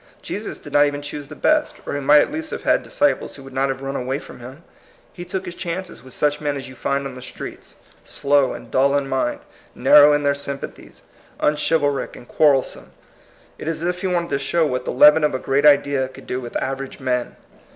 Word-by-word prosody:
Jesus -, -, -5 dB
did -, -, -12 dB
not 145 Hz, 0 st, +5 dB
even 145 Hz, 0 st, -4 dB
choose 145 Hz, 0 st, -7 dB
the -, -, -10 dB
best, 305 Hz, -1 st, +1 dB
or -, -, -4 dB
he 145 Hz, -, -1 dB
might 145 Hz, +2 st, +6 dB
at -, -, -1 dB
least 315 Hz, 0 st, -4 dB
have -, -, -6 dB
had -, -, +3 dB
disciples 290 Hz, 0 st, 0 dB
who 135 Hz, -, -12 dB
would 135 Hz, 0 st, -12 dB
not 135 Hz, +1 st, +1 dB
have 135 Hz, 0 st, -4 dB
run 135 Hz, 0 st, -4 dB
away 130 Hz, +1 st, -2 dB
from -, -, -12 dB
him. 130 Hz, +7 st, -11 dB, 0.5 s
He 175 Hz, -, -8 dB
took 190 Hz, +1 st, -4 dB
his 175 Hz, -, -6 dB
chances 180 Hz, +1 st, -5 dB
with 130 Hz, -1 st, -12 dB
such 150 Hz, 0 st, 0 dB
men 145 Hz, -1 st, -1 dB
as 135 Hz, -, -7 dB
you 130 Hz, -, -11 dB
find 140 Hz, +2 st, -2 dB
on 135 Hz, -, -5 dB
the 125 Hz, -, -10 dB
streets, -, -, -9 dB, 0.3 s
slow 140 Hz, -1 st, +2 dB
and -, -, -10 dB
dull 140 Hz, +2 st, +3 dB
in 140 Hz, -1 st, -2 dB
mind, 130 Hz, -2 st, -1 dB, 0.3 s
narrow 150 Hz, 0 st, +7 dB
in 145 Hz, 0 st, +1 dB
their 140 Hz, 0 st, +3 dB
sympa 140 Hz, -1 st, -4 dB
thies, -, -, -17 dB, 0.4 s
unchivalric 150 Hz, -1 st, +1 dB
and 120 Hz, -, -13 dB
quarrelsome. 145 Hz, -4 st, +1 dB, 0.7 s
It -, -, -7 dB
is 165 Hz, 0 st, -3 dB
as 175 Hz, -, +1 dB
if 180 Hz, 0 st, -4 dB
he 190 Hz, -, -1 dB
wanted 175 Hz, -2 st, -1 dB
to 140 Hz, -, 0 dB
show 160 Hz, +4 st, +1 dB
what 125 Hz, -3 st, -2 dB
the -, -, -2 dB
leaven 150 Hz, +4 st, +6 dB
of 150 Hz, -3 st, +2 dB
a -, -, +1 dB
great 135 Hz, +3 st, +2 dB
idea 140 Hz, -2 st, +3 dB
could 130 Hz, -, -14 dB
do 125 Hz, -, -3 dB
with 120 Hz, -1 st, -9 dB
average 135 Hz, 0 st, -4 dB
men. 125 Hz, -2 st, -2 dB
140 Hz, 235 wpm, -21 LUFS, 135-150 Hz, 0.7 s, narrow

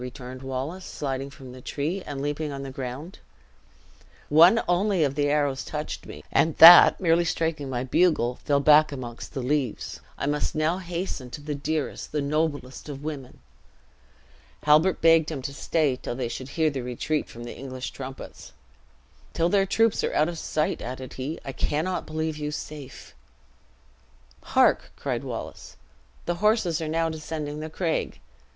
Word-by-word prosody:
returned 125 Hz, 0 st, -8 dB
Wallace, 135 Hz, +8 st, -4 dB
sliding 135 Hz, -3 st, -4 dB
from 135 Hz, -2 st, -12 dB
the 130 Hz, 0 st, -11 dB
tree, 155 Hz, +9 st, -3 dB
and 140 Hz, -1 st, -4 dB
leaping 145 Hz, +1 st, -2 dB
on 140 Hz, 0 st, -5 dB
the 135 Hz, -, -6 dB
ground. 135 Hz, +7 st, -7 dB, 1.1 s
"One 170 Hz, +9 st, +7 dB
only 180 Hz, 0 st, +2 dB
of 140 Hz, -2 st, +1 dB
the 145 Hz, 0 st, +1 dB
arrows 145 Hz, -2 st, +1 dB
touched 150 Hz, 0 st, -5 dB
me; -, -, -10 dB
and 160 Hz, -1 st, +2 dB
that 170 Hz, +2 st, +10 dB
merely 170 Hz, -1 st, +3 dB
striking 160 Hz, -4 st, -2 dB
my 125 Hz, -1 st, -2 dB
bugle, 130 Hz, -4 st, +2 dB
fell 140 Hz, -1 st, +2 dB
back 150 Hz, +1 st, +6 dB
amongst 125 Hz, -1 st, -7 dB
the 130 Hz, -, -2 dB
leaves. 135 Hz, -3 st, -2 dB, 0.2 s
I -, -, -3 dB
must 145 Hz, +1 st, -1 dB
now 155 Hz, +4 st, +1 dB
hasten 175 Hz, -7 st, -5 dB
to 145 Hz, -, -8 dB
the 150 Hz, 0 st, -4 dB
dearest, 150 Hz, +1 st, -3 dB
the 150 Hz, -, -1 dB
noblest 145 Hz, -2 st, -2 dB
of 140 Hz, 0 st, -7 dB
women!" 145 Hz, -4 st, -7 dB, 1.2 s
Halbert 155 Hz, +5 st, +4 dB
begged 165 Hz, -1 st, +5 dB
him 145 Hz, -5 st, -5 dB
to 140 Hz, -, -4 dB
stay 150 Hz, -2 st, 0 dB
till 120 Hz, -, -5 dB
they 125 Hz, -2 st, -3 dB
should 130 Hz, +2 st, -6 dB
hear 160 Hz, +1 st, +1 dB
the 135 Hz, -2 st, -4 dB
retreat 125 Hz, +5 st, -2 dB
from 120 Hz, -, -9 dB
the 120 Hz, -, -7 dB
English 130 Hz, -1 st, -6 dB
trumpets. 135 Hz, 0 st, -9 dB, 0.8 s
"Till 170 Hz, +1 st, +1 dB
their 195 Hz, 0 st, +3 dB
troops 225 Hz, +2 st, +2 dB
are -, -, -1 dB
out 155 Hz, +2 st, +3 dB
of 170 Hz, -2 st, -6 dB
sight," 155 Hz, 0 st, -1 dB
added 130 Hz, +1 st, -6 dB
he, 140 Hz, +5 st, -5 dB
"I 135 Hz, -, -4 dB
cannot 155 Hz, +7 st, -2 dB
believe 155 Hz, 0 st, -3 dB
you 150 Hz, 0 st, -2 dB
safe." 150 Hz, -2 st, -8 dB, 1.3 s
"Hark!" -, -, +2 dB
cried -, -, -3 dB
Wallace, -, -, -7 dB, 0.5 s
"the 175 Hz, -, -1 dB
horses 210 Hz, -7 st, +2 dB
are 160 Hz, -, -3 dB
now 165 Hz, +1 st, +1 dB
descending 155 Hz, -2 st, -5 dB
the 155 Hz, +1 st, -5 dB
craig. 165 Hz, 0 st, -2 dB
150 Hz, 165 wpm, -26 LUFS, 135-160 Hz, 1.3 s, that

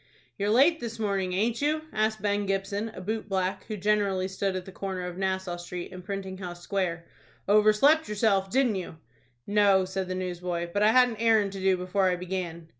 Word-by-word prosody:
"You're 205 Hz, +1 st, -1 dB
late 285 Hz, +9 st, +5 dB
this 230 Hz, -1 st, -5 dB
morning, 195 Hz, -4 st, -1 dB
aint 225 Hz, +6 st, 0 dB
you?" 305 Hz, +2 st, +1 dB
asked 215 Hz, -1 st, 0 dB
Ben 205 Hz, -1 st, 0 dB
Gibson, 195 Hz, +3 st, -2 dB
a -, -, -7 dB
boot 215 Hz, +3 st, -4 dB
black, 190 Hz, -1 st, -1 dB
who 215 Hz, -, -5 dB
generally 200 Hz, -2 st, +1 dB
stood 190 Hz, 0 st, -2 dB
at 185 Hz, -1 st, -4 dB
the 190 Hz, -, -9 dB
corner 190 Hz, -1 st, -4 dB
of 180 Hz, -1 st, -6 dB
Nassau 190 Hz, -1 st, -2 dB
Street 175 Hz, +1 st, -7 dB
and 185 Hz, 0 st, -9 dB
Printing 190 Hz, 0 st, -5 dB
House 175 Hz, -2 st, -7 dB
Square. 175 Hz, -4 st, -2 dB, 0.4 s
"Overslept 215 Hz, +10 st, +4 dB
yourself, 200 Hz, -2 st, +1 dB
didn't 245 Hz, -3 st, +2 dB
you?" 175 Hz, -3 st, -7 dB, 0.5 s
"No," 200 Hz, -2 st, +4 dB
said 190 Hz, 0 st, -3 dB
the 185 Hz, -, -3 dB
newsboy; 175 Hz, -1 st, -3 dB
"but 205 Hz, -, 0 dB
I 210 Hz, -, +6 dB
had 250 Hz, +2 st, +5 dB
an 225 Hz, -, -6 dB
errand 220 Hz, -3 st, +3 dB
to 195 Hz, -, -7 dB
do 190 Hz, -1 st, +2 dB
before 185 Hz, +1 st, +1 dB
I 180 Hz, -, +1 dB
began." 175 Hz, -2 st, -5 dB
195 Hz, 200 wpm, -27 LUFS, 185-215 Hz, 0.5 s, I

